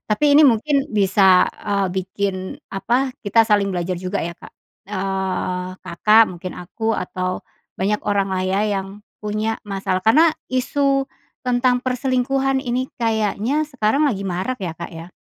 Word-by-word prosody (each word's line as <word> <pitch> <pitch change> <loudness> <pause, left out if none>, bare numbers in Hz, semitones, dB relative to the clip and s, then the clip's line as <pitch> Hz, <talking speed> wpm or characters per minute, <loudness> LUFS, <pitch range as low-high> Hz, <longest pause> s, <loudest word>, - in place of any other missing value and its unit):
tapi 215 +8 +1
ini - - +8
mungkin 275 +4 +2
bisa, 190 -2 +5
eee, 200 -2 0
bikin 190 +1 -2 0.4
apa, 245 +7 0
kita 225 +2 +4
saling 210 -2 +2
belajar 175 0 -2
juga, 185 +2 -3
ya, 170 +1 -4
Kak. - - -13 0.3
Eee, 190 -2 -2
Kakak, 215 +6 +5
mungkin 180 0 -7
aku, 220 +5 -3
atau 185 -1 -3 0.3
banyak 205 +3 0
orang, 200 -1 +1
lah, 185 -1 -1
ya, 190 +2 +1 0.2
yang 195 +2 -8 0.2
punya 215 +1 -2
masalah 195 -2 -1
karena 285 - +5 0.2
isu 275 +2 +1 0.4
tentang 250 0 +1
perselingkuhan 265 +1 0
ini 250 0 -1
kayaknya 225 +5 0
sekarang 270 +1 +1
lagi 205 -8 -1
marak, 195 +7 -3
ya, 180 - -2
Kak, 170 - -7
ya. 165 +2 -8
210 Hz, 145 wpm, -21 LUFS, 190-250 Hz, 0.4 s, ini